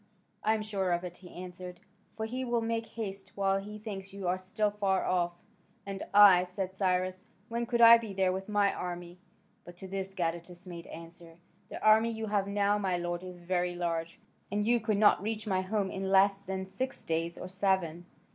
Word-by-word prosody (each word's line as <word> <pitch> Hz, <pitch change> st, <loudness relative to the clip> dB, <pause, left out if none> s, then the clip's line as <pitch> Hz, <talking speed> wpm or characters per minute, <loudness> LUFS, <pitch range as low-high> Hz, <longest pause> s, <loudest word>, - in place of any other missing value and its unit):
"I 220 Hz, +1 st, +3 dB
am 215 Hz, -, -3 dB
sure 195 Hz, -4 st, -1 dB
of 175 Hz, +1 st, -1 dB
it," 180 Hz, -1 st, -7 dB
he 180 Hz, -, -13 dB
answered, 180 Hz, 0 st, -8 dB, 0.4 s
"for 220 Hz, -, -2 dB
he 250 Hz, +3 st, -3 dB
will 240 Hz, -2 st, +1 dB
make 225 Hz, 0 st, -2 dB
haste 195 Hz, -4 st, -6 dB
while 195 Hz, -1 st, +2 dB
he 210 Hz, +2 st, -8 dB
thinks 200 Hz, -2 st, -7 dB
you 195 Hz, -2 st, -5 dB
are 180 Hz, +1 st, +1 dB
still 205 Hz, +3 st, 0 dB
far 200 Hz, -2 st, 0 dB
off." 175 Hz, -1 st, +1 dB, 0.5 s
"And 195 Hz, -1 st, -5 dB
I," 200 Hz, -3 st, +8 dB
said 185 Hz, +1 st, -4 dB
Cyrus, 185 Hz, -1 st, 0 dB, 0.2 s
"when 235 Hz, 0 st, -2 dB
could 235 Hz, 0 st, +1 dB
I 230 Hz, 0 st, +10 dB
be 225 Hz, -3 st, -6 dB
there 190 Hz, -1 st, +2 dB
with 190 Hz, +2 st, -5 dB
my 205 Hz, -1 st, +3 dB
army?" 175 Hz, 0 st, -6 dB, 0.4 s
But 175 Hz, 0 st, -12 dB
to 190 Hz, -, -8 dB
this 195 Hz, 0 st, -5 dB
Gadatas 175 Hz, +1 st, -3 dB
made 170 Hz, -2 st, -8 dB
answer, 165 Hz, 0 st, -11 dB, 0.3 s
"The -, -, -6 dB
army 220 Hz, +2 st, +6 dB
you 225 Hz, -1 st, -4 dB
have 205 Hz, -2 st, 0 dB
now, 205 Hz, +1 st, +2 dB
my 190 Hz, -3 st, 0 dB
lord, 175 Hz, 0 st, -3 dB
is 180 Hz, -1 st, -8 dB
very 175 Hz, 0 st, -1 dB
large, 170 Hz, -1 st, -3 dB, 0.3 s
and 205 Hz, 0 st, 0 dB
you 240 Hz, +1 st, +3 dB
could 215 Hz, -2 st, 0 dB
not 205 Hz, -3 st, +5 dB
reach 215 Hz, +1 st, -3 dB
my 190 Hz, -3 st, +1 dB
home 195 Hz, 0 st, -1 dB
in 190 Hz, 0 st, -3 dB
less 195 Hz, +1 st, +4 dB
than 190 Hz, -1 st, -4 dB
six 195 Hz, +8 st, -4 dB
days 165 Hz, +1 st, -1 dB
or -, -, -6 dB
seven." 185 Hz, -3 st, 0 dB
190 Hz, 205 wpm, -31 LUFS, 180-210 Hz, 0.5 s, I